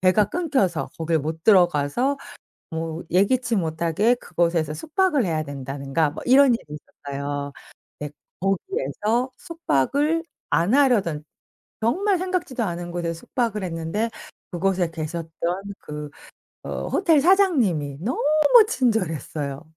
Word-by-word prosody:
배가 185 +3 +4
끊겨서 275 - 0
거기를 160 -1 +1
못 160 +2 -5
들어가서 180 - +3 0.6
뭐 165 +1 -4
예기치 230 +5 +2
못하게 170 +7 +1
그곳에서 170 - 0
숙박을 310 - +1
해야 160 -3 -1
된다든가 140 +2 -2
뭐 - - -8
이런 260 -1 +6
일이 - - -8 0.5
있었어요. 140 0 -3 0.5
근데 150 0 -6 0.3
거기에서 230 - -1
숙박을 315 - 0 0.3
안 175 +8 +2
하려던 205 - +3 0.6
정말 370 - +2
생각지도 360 -10 -2
않은 175 -2 -4
곳에서 170 -1 -2
숙박을 225 -6 -2
했는데 170 +6 -2 0.4
그곳에 180 -1 0
계셨던 165 +1 -5 0.5
그 150 0 -7 0.6
어 - - -4
호텔 330 -6 +3
사장님이 255 - +3
너무 245 +6 -1 0.5
친절했어요. 160 - -1
180 Hz, 280 characters per minute, -23 LUFS, 160-255 Hz, 0.6 s, 이런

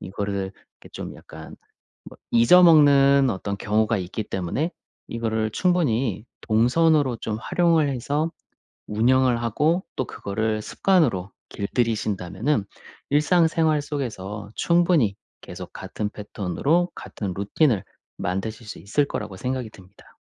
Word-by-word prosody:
이거를 100 +1 -4 0.4
이렇게 - - -14
좀 - - -7
약간 80 +1 -12 0.5
뭐 - - -13
잊어 120 +11 +6
먹는 140 -4 +6
어떤 100 +1 -4
경우가 110 +2 +1
있기 95 +4 -4
때문에 100 - -2 0.4
이거를 110 -1 -1
충분히 125 - 0 0.2
동선으로 130 +4 +3
좀 110 -1 -4
활용을 165 0 +2
해서 145 +5 -1 0.6
운영을 120 +2 +2
하고 150 - +1
또 130 - 0
그거를 110 +2 -2
습관으로 125 - +1 0.2
길들이신다면은 105 - -1 0.5
일상생활 160 +1 +3
속에서 105 -8 -5
충분히 170 - +2 0.2
계속 - - -9
같은 105 -1 -5
패턴으로 110 - -1
같은 100 -4 -6
루틴을 105 - +1 0.3
만드실 110 +5 -4
수 105 - -8
있을 140 +9 0
거라고 105 -7 -5
생각이 125 -1 -3
듭니다. 95 -1 -19
115 Hz, 290 characters per minute, -24 LUFS, 105-150 Hz, 0.6 s, 잊어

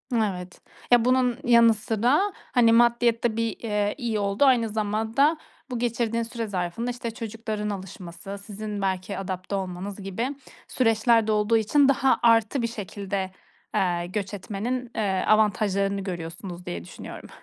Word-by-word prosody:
Evet. 185 -5 -2 0.3
Ya, 240 -1 +6
bunun 255 -1 +3
yanı 235 -2 +6
sıra, 245 - +1 0.2
hani, 230 -3 +5
maddiyat 235 0 +3
da 230 -2 +1
bir, 230 -1 -1
eee, 210 -2 -1
iyi 230 -5 -1
oldu, 200 +7 +2
aynı 240 -4 +4
zamanda 220 +8 +1 0.3
bu 245 - -3
geçirdiğin 235 -1 0
süre 230 -1 -4
zarfında, 190 +5 -2
işte, 240 -1 -5
çocukların 220 -2 -4
alışması, 190 0 -7
sizin 210 -1 -5
belki 190 0 -2
adapte 190 +1 -4
olmanız 190 +1 -5
gibi 195 +6 -3 0.4
süreçlerde 225 -2 +3
olduğu 210 +2 +3
için 275 +6 +4
daha 270 -1 +3
artı 230 +2 +4
bir 235 - 0
şekilde, 200 -3 -4 0.4
eee, 175 -2 +1
göç 200 +1 -4
etmenin, 230 +5 -4
eee, 195 -4 0
avantajlarını 200 -2 +2
görüyorsunuz 175 0 -6
diye 85 -1 -5
düşünüyorum. - - -10
215 Hz, 140 wpm, -25 LUFS, 195-235 Hz, 0.4 s, Ya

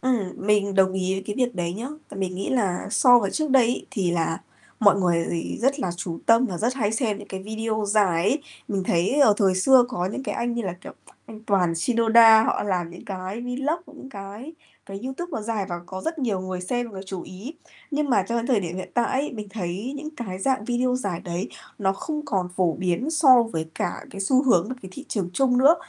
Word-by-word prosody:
Ừm, 235 -8 0
mình 200 -1 +1
đồng 190 -1 +4
ý 190 0 -1
với 195 - -4
cái 205 - -4
việc 250 -3 0
đấy 175 -1 -2
nhá, 230 +7 -5 0.3
mình 185 -2 -2
nghĩ 190 - -3
là 200 -8 0
so 245 +2 +6
với 200 -4 -1
trước 310 +2 -1
đây 260 -3 +5
ấy, 245 - -2
thì 195 -9 0
là 165 -1 -1 0.4
mọi 205 -2 +6
người 170 -2 +2
gì 165 -1 -3
rất 275 +3 +2
là 185 - -1
chú 170 -2 -5
tâm 230 +3 +5
và 180 -6 -5
rất 240 +6 0
hay 215 -5 0
xem 220 -3 0
những - - -11
cái 190 0 -6
video 220 +1 -2
dài 200 -5 +3
ấy. 270 - +1 0.3
Mình 200 -4 -1
thấy, 185 +12 +1
ờ, 220 -7 +6
thời 195 -3 +3
xưa 250 +7 +6
có 180 -8 -2
những 210 +8 -4
cái - - -3
anh 235 0 -1
như 235 - -2
là, 190 -4 -3
kiểu, - - -10 0.3
anh 215 -1 -11
Toàn 180 -5 +2
Shinoda, 225 +4 +6
họ - - 0
làm 180 -4 -1
những 175 - -12
cái 190 +3 -5
vlog, 270 +7 -2 0.2
những 270 - -10
cái 205 +8 -8 0.3
cái 195 0 -7
YouTube 305 +7 -5
nó 225 - -2
dài 215 -3 -2
và 175 -1 -4
có 190 +1 -6
rất 325 0 -3
nhiều 220 -9 -1
người 185 -1 -4
xem 240 +5 -2
và 195 - -7
chú 190 -2 -5
ý. 210 - -9 0.4
Nhưng 295 -1 -1
mà 220 - +4
cho 235 - 0
đến 235 0 -1
thời 250 -6 +2
điểm 175 -1 -5
hiện 185 - -6
tại 240 -1 +2
ấy, 295 - -4
mình 210 -3 -7
thấy 195 +4 -4
những 300 +2 -6
cái 190 -6 -5
dạng 255 +2 0
video 250 +2 0
dài 200 -9 -3
đấy 175 +2 -4 0.3
nó 195 -2 +1
không 300 +9 -5
còn 190 -9 -1
phổ 180 -3 +2
biến 185 - -1
so 275 -7 +6
với 165 -9 -4
cả 175 - -3
cái 195 - -8
xu 255 +7 +3
hướng 210 -8 +3
và 255 - -3
cái 190 - -9
thị 275 - -8
trường 190 -5 -2
chung 250 +4 +2
nữa, 280 +5 +7
210 Hz, 240 wpm, -24 LUFS, 185-250 Hz, 0.4 s, nữa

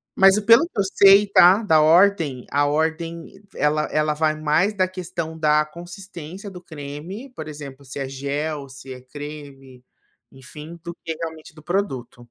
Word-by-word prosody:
mas 195 +2 +6
pelo 230 +7 +6
que 335 - -7
eu - - +3
sei 195 +1 +6
tá, 195 +2 +6
da 160 -6 +4
ordem, 165 -5 +3
a 145 +1 +2
ordem 160 +2 -2 0.3
ela 150 +1 +1
ela 155 0 +1
vai 155 0 0
mais 165 +7 +1
da 185 -1 +2
questão 170 -3 -6
da 150 0 +3
consistência 175 +3 -10
do 180 -2 -11
creme, 160 - -8
por - - -7
exemplo, 140 -2 -9
se 130 +2 -8
é 135 - -3
gel, 140 +2 -4
se 135 0 -11
é 125 - -10
creme, 140 -2 -10 0.5
enfim, 150 +5 -11
do 170 0 -6
que 160 -1 -3
realmente 160 -1 -8
do 155 - -15
produto. 135 -11 -3
155 Hz, 165 wpm, -22 LUFS, 145-185 Hz, 0.5 s, mas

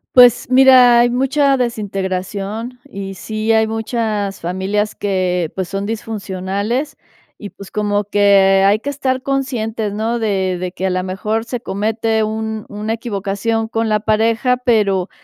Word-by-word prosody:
Pues, 245 -1 +6
mira, 255 -2 +7
hay 240 0 +4
mucha 270 +2 +2
desintegración 205 0 -3
y 195 -6 -7
sí 215 +3 -2
hay 220 0 +4
muchas 220 -3 -2
familias 190 +4 -1
que, 180 -4 -1
pues, 190 -2 -3
son 195 +1 -3
disfuncionales 210 +4 -3 0.4
y 205 - -7
pues, 200 -1 -13
como 205 -1 0
que 200 -1 +4
hay 200 +2 +4
que 285 +5 -4
estar 260 -2 -2
conscientes, 235 -6 -2
¿no?, 225 +3 -2
de 190 -4 0
de 180 -1 -4
que 190 +1 -4
a 190 - +1
la 185 0 0
mejor 210 +5 -2
se 245 -1 -5
comete 220 +1 -1
un 220 0 -4
una 210 +2 -3
equivocación 220 0 -2
con 225 0 -1
la 210 -1 +1
pareja, 225 +3 +1
pero 210 -6 +1
215 Hz, 150 wpm, -17 LUFS, 195-235 Hz, 0.4 s, mira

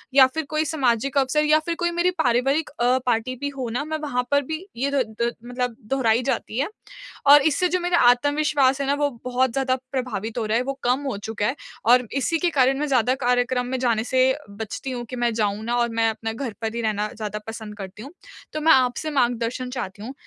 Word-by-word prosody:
या 265 -2 +8
फ़िर 315 +3 -4
कोई 310 0 0
सामाजिक 275 -3 0
अवसर 290 +3 +2
या 305 +1 +5
फ़िर 335 +2 -3
कोई 345 -1 +1
मेरी 345 +1 +1
पारिवारिक 275 -1 +1
अ, 250 -1 +1
पार्टी 245 +1 0
भी 285 +3 -3
हो 255 -3 -3
ना, 245 +5 -2
मैं 315 0 -3
वहाँ 250 -5 -1
पर 285 0 +4
भी 315 +6 -5
ये 275 +3 0
द 275 -2 +2 0.2
द 235 - +2
मतलब 245 -1 -3
दोहराई 235 -2 +2
जाती 220 - -2
है। 295 +7 0 0.6
और 290 0 +9
इससे 315 +5 +2
जो 365 - +1
मेरा 350 0 +1
आत्मविश्वास 280 +1 +2
है 275 - -2
ना 280 - +3
वो 290 0 +1 0.2
बहुत 255 0 +1
ज़्यादा 260 0 +1 0.2
प्रभावित 235 -4 -3
हो 230 - -1
रहा 215 +1 +1
है, 245 - 0
वो 275 - -3
कम 250 +3 +2
हो - - -4
चुका 210 +1 -3
है 265 - -1 0.3
और 245 +1 +5
इसी 280 +5 0
के 350 - +2
कारण 270 -2 +2
मैं 300 - -1
ज़्यादा 255 -2 +2
कार्यक्रम 245 0 +1
में 260 +1 -2
जाने 230 -3 +1
से 260 0 +3 0.2
बचती 220 +5 -6
हूँ 245 -1 -4
कि 250 - -7
मैं 240 -1 +1
जाऊँ 210 -1 -1
ना 240 +1 0
और 235 0 +1
मैं 225 - +4
अपने 225 0 -4
घर 235 -2 -5
पर 225 0 -2
ही 235 - -2
रहना 215 -1 -1
ज़्यादा 210 -1 -4
पसंद 220 -2 -7
करती 195 +2 -8
हूँ। 275 - -10 0.4
तो 305 - -3
मैं 320 - +5
आपसे 255 +4 +2
मार्गदर्शन 245 -1 0
चाहती 205 -5 -6
हूँ 255 +5 -6
255 Hz, 230 wpm, -23 LUFS, 230-285 Hz, 0.6 s, और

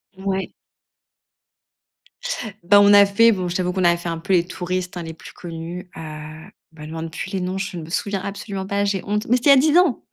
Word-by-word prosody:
Ouais. 190 0 -3 2.1
Bah, 205 +4 +6
on 205 0 +6
a 205 0 +8
fait, 230 +4 +4
bon, 185 -4 -2
je 175 - -4
t'avoue 180 -1 -1
qu'on 185 -1 -1
a 170 0 +5
fait 170 0 -5
un 165 - -3
peu 165 +4 -2
les 175 -2 +3
touristes, 180 0 -4
hein, 175 - -4
les 160 0 -7
plus 160 - -13
connus, 175 +2 -8
heu, - - -7 0.8
me 150 - -9
demande 160 +1 -6
plus 180 +3 -6
les 190 - -2
noms, 185 +1 -3
je 190 -2 -4
ne 165 - -6
me 155 - -10
souviens 195 +2 -2
absolument 195 -1 -5
pas, 200 +1 0
j'ai 200 -2 -1
honte, 210 +1 -2
mais 245 - +4
c'était 265 +4 +4
il - - +7
y - - +5
a - - +5
10 320 - +4
ans. 355 -9 +3
185 Hz, 235 wpm, -21 LUFS, 175-200 Hz, 2.1 s, a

